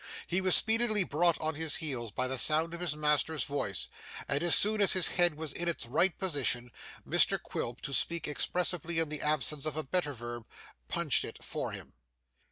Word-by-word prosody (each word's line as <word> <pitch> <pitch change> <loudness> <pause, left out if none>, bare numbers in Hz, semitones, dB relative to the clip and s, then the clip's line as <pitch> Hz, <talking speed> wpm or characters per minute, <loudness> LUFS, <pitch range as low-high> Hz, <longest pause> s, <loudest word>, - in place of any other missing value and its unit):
He 180 +2 -1
was 185 -1 +4
speedily 220 -2 +3
brought 170 +1 +1
on 155 0 -1
his 160 0 0
heels 130 -8 -1
by 130 +5 -2
the 130 0 -1
sound 160 +4 +2
of 170 - -6
his 175 -4 -3
master's 150 +1 +1
voice, 100 - -2 0.4
and 140 - 0
as 175 -1 +5
soon 210 +1 +3
as 200 - +6
his 185 -3 +4
head 175 -3 +2
was 155 -2 -5
in 175 - -3
its 165 -8 -3
right 160 +9 +1
position, 135 - -1 0.4
Mr - - +3
Quilp, 120 +2 -6
to 140 - -5
speak 170 +3 +1
expressively 170 +2 -1
in 165 -2 +1
the 150 -1 -3
absence 150 -1 0
of 155 -1 -4
a 155 - -2
better 150 -1 -2
verb, 120 -1 -8 0.4
'punched - - +1
it' - - -10
for - - -4
him. - - -10
155 Hz, 195 wpm, -30 LUFS, 140-175 Hz, 0.4 s, as